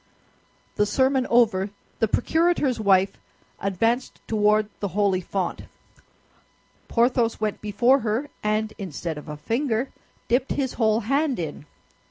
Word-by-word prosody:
The 210 - +3
sermon 260 +3 +2
over, 215 -5 +3 0.3
the 225 - +3
procurator's 320 - +1
wife 195 -2 +3 0.4
advanced 225 +6 0
toward 215 0 +3
the 200 - -1
holy 195 -3 +2
font. 185 0 -3 1.2
Porthos 235 -1 +2
went 215 -1 -2
before 240 +6 +3
her, 235 +5 -2
and 215 +1 0
instead 170 -4 -4
of 150 - -12
a 150 - -6
finger, 235 - -1 0.4
dipped 250 +3 +1
his 265 -3 -1
whole 220 -1 +2
hand 275 +4 +1
in. 150 -3 -5
220 Hz, 125 wpm, -24 LUFS, 200-250 Hz, 1.2 s, The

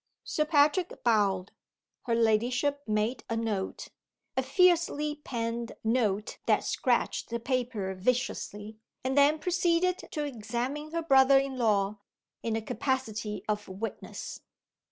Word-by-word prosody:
Sir 305 - 0
Patrick 305 +4 +2
bowed. 200 -5 +2 0.6
Her 230 - +2
ladyship 245 +5 +2
made 215 +3 0
a 225 - -1
note 215 -4 -3 0.5
a - - +2
fiercely 340 -5 +2
penned 230 -1 -3
note 220 -3 0
that - - +3
scratched - - 0
the 235 0 -2
paper 240 -6 -2
viciously 215 0 -2 0.2
and 260 +1 -1
then 290 +2 +5
proceeded 360 +1 +1
to 300 - -3
examine 250 +4 -3
her 335 +1 -2
brother 270 -2 +6
in 270 0 0
law, 210 -4 +1 0.4
in 230 -1 -1
the 225 - -2
capacity 220 -3 -2
of 210 -1 -2
witness. 195 +4 -6
240 Hz, 125 wpm, -29 LUFS, 215-285 Hz, 0.6 s, brother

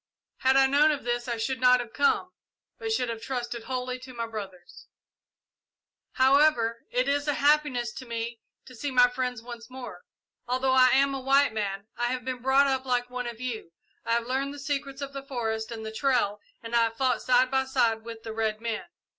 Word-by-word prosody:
Had 265 +1 +3
I 270 - +6
known 285 +3 +4
of 295 -3 -1
this 240 +1 -2
I 235 -1 -2
should 255 +3 -2
not 250 0 +6
have 235 -2 -6
come, 285 +6 +2 0.5
but 445 -1 -3
should 255 - +1
have 230 -1 -5
trusted 240 -3 -4
wholly 255 +1 -3
to 255 0 -11
my 230 -1 -2
brothers. 195 -6 -9 1.3
"However, 260 -4 +3
it 250 +2 0
is 285 +1 0
a 295 - +1
happiness 285 -5 +2
to 255 - -9
me 230 0 -4 0.3
to 255 - -13
see 285 +4 -4
my 250 -2 +6
friends 250 -2 -3
once 235 -1 -9
more. 250 -8 -9 0.5
Although 255 +1 +1
I 255 -1 +7
am 275 +2 +3
a 270 - -3
white 275 -1 +3
man, 200 -2 -3
I 240 - +1
have 250 -1 -3
been 255 -1 -4
brought 265 +2 +4
up 265 -1 0
like 250 -1 -1
one 250 -1 -3
of 235 -1 -7
you. 230 -9 -5 0.3
I 230 - 0
have 235 0 +1
learned 270 +3 -2
the - - -9
secrets 275 -1 -3
of 280 0 -7
the 275 - -5
forest 225 -5 -3
and 220 -1 -6
the 220 - -5
trail 220 -4 +1 0.2
and 230 +1 -8
I 230 -1 +5
have 225 0 -5
fought 255 -1 +1
side 255 +1 +3
by 265 0 +2
side 235 -4 +1
with 230 0 -9
the 225 - -6
red 220 -1 -1
men. 230 -1 -3
250 Hz, 215 wpm, -27 LUFS, 230-270 Hz, 1.3 s, I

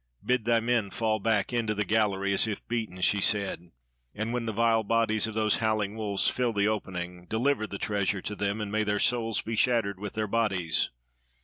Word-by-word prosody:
"Bid 125 -3 +1
thy 115 0 +4
men 115 -3 0
fall 110 +2 0
back 105 0 0
into 110 -3 0
the 105 0 -1
gallery 100 -2 +1
as 100 - +2
if 105 -2 -5
beaten," 110 -6 -3
she 100 +2 +2
said. 95 -4 0 0.5
"And 110 +3 -3
when 120 -2 -2
the - - 0
vile 115 +1 +2
bodies 110 0 +1
of 110 - -6
those 110 -1 +2
howling 110 -2 0
wolves 105 -3 0
fill 125 -2 +1
the 100 0 +2
opening, 90 -4 -4
deliver 115 +1 0
the 100 - -6
treasure 100 -1 -1
to 105 - -4
them, 100 +1 -1
and 105 -1 -4
may 110 +1 +1
their 105 0 0
souls 115 0 +1
be 115 - -3
shattered 115 -6 +1
with 105 -1 -6
their 110 0 -1
bodies! 100 -7 0
110 Hz, 205 wpm, -28 LUFS, 100-115 Hz, 0.5 s, thy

